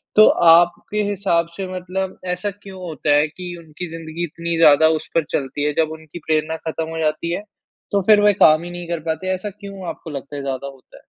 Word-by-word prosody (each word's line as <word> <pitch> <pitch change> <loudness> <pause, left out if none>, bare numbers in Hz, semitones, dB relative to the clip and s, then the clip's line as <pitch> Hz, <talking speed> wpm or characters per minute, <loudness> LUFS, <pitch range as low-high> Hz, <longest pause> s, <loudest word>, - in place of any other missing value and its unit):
तो 215 - +9 0.3
आपके 175 +5 +3
हिसाब 180 -4 +1
से 195 -1 -3
मतलब 185 +1 -4 0.2
ऐसा 185 +4 -3
क्यों 190 -2 -10
होता 155 -4 0
है 150 +1 +4
कि 175 +3 -8
उनकी 165 +2 -8
ज़िंदगी 165 +1 -6
इतनी 170 0 -3
ज़्यादा 160 -1 +7
उस - - -12
पर 165 - +3
चलती 140 +1 -2
है, 150 - +1
जब 160 -1 +2
उनकी 160 +1 -9
प्रेरणा 155 0 0
खत्म 160 0 -3
हो 165 - -5
जाती 155 +1 -1
है, 180 - -2 0.5
तो 200 - +2
फिर 215 -1 +7
वो 205 0 +5
काम 155 +1 +6
ही 175 - -7
नहीं 175 -1 -7
कर 170 -1 -2
पाते 185 +4 -1
ऐसा 185 +3 -5
क्यों 200 -2 -9
आपको - - -8
लगता 140 0 -7
है 140 - -4
ज़्यादा 135 0 -3
होता 135 -2 -14
है? - - -19
170 Hz, 220 wpm, -20 LUFS, 155-185 Hz, 0.5 s, तो